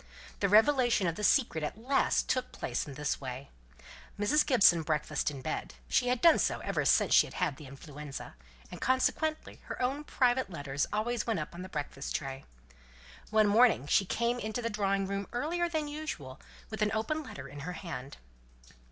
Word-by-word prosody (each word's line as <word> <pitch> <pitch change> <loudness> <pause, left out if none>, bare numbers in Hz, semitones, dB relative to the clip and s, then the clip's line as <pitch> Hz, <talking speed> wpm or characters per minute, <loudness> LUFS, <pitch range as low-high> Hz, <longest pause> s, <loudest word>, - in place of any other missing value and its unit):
The 200 - +1
revelation 240 0 +4
of 170 - +1
the 210 - -7
secret 210 - +3
at 150 - -3
last 265 +5 +1
took 255 - -1
place - - -3
in 140 - -8
this 150 0 -2
way. 130 +1 -7 0.7
Mrs. 295 +9 +3
Gibson 205 - +5
breakfasted 150 -1 -1
in 130 - -9
bed: 155 - -4
she 245 - +2
had 250 -1 +1
done 335 -1 +6
so - - +1
ever - - -1
since - - +4
she - - +6
had - - -12
had 165 -7 -1
the 150 - -11
influenza; 140 +1 -9 0.4
and, - - -9
consequently, 310 +4 0
her - - -6
own 270 +4 -1
private 255 -4 +1
letters 145 -5 -2
always 225 +2 -1
went 225 -3 0
up - - -6
on 175 - -8
her 185 - -8
breakfast 145 -4 -5
tray. 135 -2 -4 0.8
One 215 0 +4
morning 215 - +4
she 175 - +3
came 235 +5 0
into 220 +1 -3
the 230 - -1
drawing 195 -2 0
room 200 0 -3
earlier 340 +8 -1
than 315 -3 -2
usual, 290 - -6 0.3
with 220 -1 -5
an 210 - +3
open 310 +9 -1
letter 140 - -9
in 145 +1 -10
her 170 +6 -5
hand. 150 -6 -7
205 Hz, 185 wpm, -31 LUFS, 150-250 Hz, 0.8 s, done